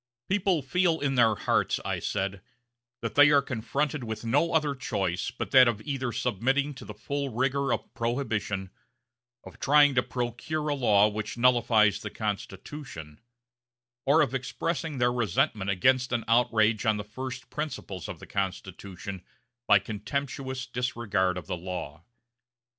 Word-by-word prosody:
"People 190 -5 +1
feel 165 +4 +1
in 140 -1 0
their 115 -4 +4
hearts," - - +1
I - - -1
said, 100 -1 -2 0.6
"that 115 - -2
they 145 0 +7
are 145 -1 +5
confronted 135 +4 -2
with 110 0 -5
no 165 +9 +2
other 155 -3 +2
choice 95 -8 -2
but 125 - -6
that 130 -2 +8
of 115 -3 0
either 135 -4 -2
submitting 135 +6 0
to 130 - -11
the 105 - -9
full 140 +6 -3
rigor 135 +3 0
of - - -3
Prohibition, 110 -6 -2 0.7
of - - -13
trying 145 0 +5
to 125 - +3
procure 125 +6 -3
a - - +2
law 105 -7 +4
which 105 +2 -4
nullifies 120 -4 +4
the - - -6
Constitution, 100 - -6 0.9
or 155 +4 +6
of 135 - -2
expressing 140 +4 -3
their 120 0 +2
resentment 115 - 0
against 125 +7 +2
an 120 -2 -1
outrage 115 -2 +3
on 110 -1 +2
the 105 - -4
first 130 +4 -7
principles 145 - -5
of - - -6
the - - -11
Constitution 95 -1 -5 0.4
by 105 - +7
contemptuous 130 +6 -4
disregard 115 -7 -1
of 90 - -6
the - - -3
law." 85 -3 -6
120 Hz, 150 wpm, -28 LUFS, 105-140 Hz, 0.9 s, that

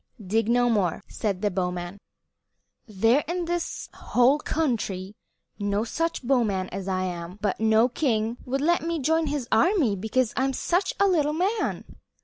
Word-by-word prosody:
"Dig 215 +2 0
no 245 +1 +3
more," 205 -8 0
said 200 -2 -3
the 205 - +2
bowman. 180 +1 -3 0.9
"There 225 +5 +3
is 345 +2 -2
in 350 - -2
this 345 0 -3
whole 255 +4 +2
country 215 -12 -2 0.4
no 205 +1 0
such 330 +6 -2
bowman 220 -8 +1
as 195 0 -6
I 185 -1 0
am; 175 0 -5
but 205 -3 -1
no 220 +1 +4
king 235 -3 -1
would 270 +2 -2
let 345 +4 +2
me 335 +1 -2
join 320 +2 +1
his 285 -4 -2
army 260 - +3
because 220 +4 0
I 265 - +1
am 270 - 0
such 360 +8 0
a 400 - +5
little 305 -5 +2
man. 395 +6 -1
235 Hz, 165 wpm, -25 LUFS, 200-300 Hz, 0.9 s, a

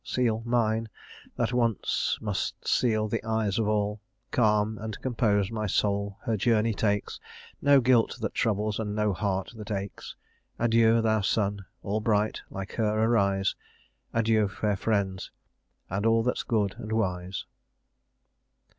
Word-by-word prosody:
Seal 115 -3 0
mine, 115 -2 +1 0.5
that 120 0 -1
once 115 -3 +1
must 105 -3 -3
seal 110 -3 +2
the 110 0 -2
eyes 110 -2 0
of 110 - +1
all. 105 0 0 0.3
Calm 105 -2 +2
and 110 0 -6
composed 110 -6 +1
my 110 -2 -2
soul 100 0 0
her 115 - 0
journey 110 +1 +2
takes; 105 0 -1 0.4
No 140 -1 +6
guilt 120 -1 +3
that 110 - -3
troubles, 105 -1 0
and 105 -2 -3
no 105 -1 +1
heart 95 +1 -2
that 105 -1 -9
aches. 100 -1 -5 0.4
Adieu, 115 -1 +4
thou 110 -1 +2
sun! 100 0 0 0.2
all 105 +1 -1
bright, 105 -1 +1
like 95 0 -6
her, 110 -1 +1
arise! 100 -4 +2 0.6
Adieu, 110 -2 +2
fair 105 +1 -1
friends, 95 -2 -1 0.6
and 100 +3 -2
all 115 0 +3
that's 125 - 0
good 105 -5 0
and 110 -2 -6
wise!" 95 -4 -2
110 Hz, 140 wpm, -27 LUFS, 100-115 Hz, 0.6 s, No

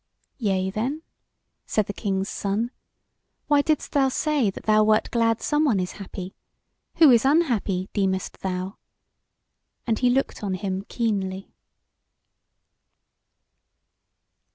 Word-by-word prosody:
"Yea 190 -4 0
then," 260 +10 -3 0.6
said 215 - +1
the 205 - -5
King's 195 -2 -2
Son, 210 +5 -2 0.7
"why 290 -1 +4
didst 305 0 -1
thou 270 -2 +3
say 290 -4 +1
that 190 - -8
thou 215 0 +4
wert 215 0 +2
glad 230 -1 +1
someone 295 -9 +2
is 180 0 -2
happy? 185 -1 -7 0.6
Who 315 -5 +7
is 235 -2 +5
unhappy, 240 - +1
deemest 190 -2 -1
thou?" 185 +1 -4 1.1
and 225 -2 0
he 250 - +3
looked 265 +2 0
on 195 -2 -1
him 190 0 -3
keenly. 195 -5 -2
215 Hz, 115 wpm, -24 LUFS, 190-255 Hz, 1.1 s, Who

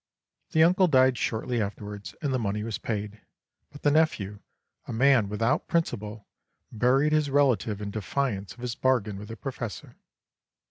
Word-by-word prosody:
The 160 - +6
uncle 185 +2 +5
died 130 -4 +4
shortly 115 +1 -1
afterwards, 100 0 -6
and 140 -3 0
the 130 - +1
money 105 -1 -2
was 110 -1 -4
paid, 105 -1 -4 0.5
but 145 - -13
the 145 - +4
nephew, 110 -11 +1 0.5
a - - -5
man 125 -3 +4
without 115 +8 0
principle, 105 -10 -2 0.5
buried 130 +6 +2
his 155 -2 +2
relative 130 -7 +2
in 100 - -4
defiance 110 -1 -2
of 120 - -15
his 125 -1 -3
bargain 115 -7 0
with 105 - -9
the 115 - -8
Professor. 120 -6 -6
115 Hz, 155 wpm, -27 LUFS, 105-140 Hz, 0.5 s, The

